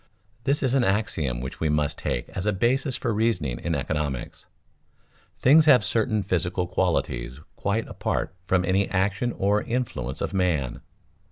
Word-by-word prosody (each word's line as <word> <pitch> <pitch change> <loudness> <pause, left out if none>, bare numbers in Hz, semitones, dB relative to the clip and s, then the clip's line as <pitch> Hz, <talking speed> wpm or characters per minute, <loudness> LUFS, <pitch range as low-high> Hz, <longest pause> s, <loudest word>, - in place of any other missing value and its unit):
_ - - -36 0.4
This 140 +2 +1
is 130 -1 +1
an 135 -2 +3
axiom 80 - 0
which 65 +1 -6
we 80 - 0
must 75 -1 0
take - - -2
as 95 +2 -4
a - - +4
basis 130 +6 +1
for 115 - -1
reasoning 105 - 0
in 85 -1 -1
economics. 70 -2 -3 0.9
Things 150 +4 +6
have 140 -5 +6
certain 110 -2 0
physical 90 -1 0
qualities 65 -7 -1 0.2
quite 105 +3 -1
apart - - -2
from 90 0 +2
any 95 +2 +1
action 100 +5 0
or 105 0 +1
influence 90 - -3
of 85 - -3
man. 85 -10 0
95 Hz, 160 wpm, -25 LUFS, 75-115 Hz, 0.9 s, Things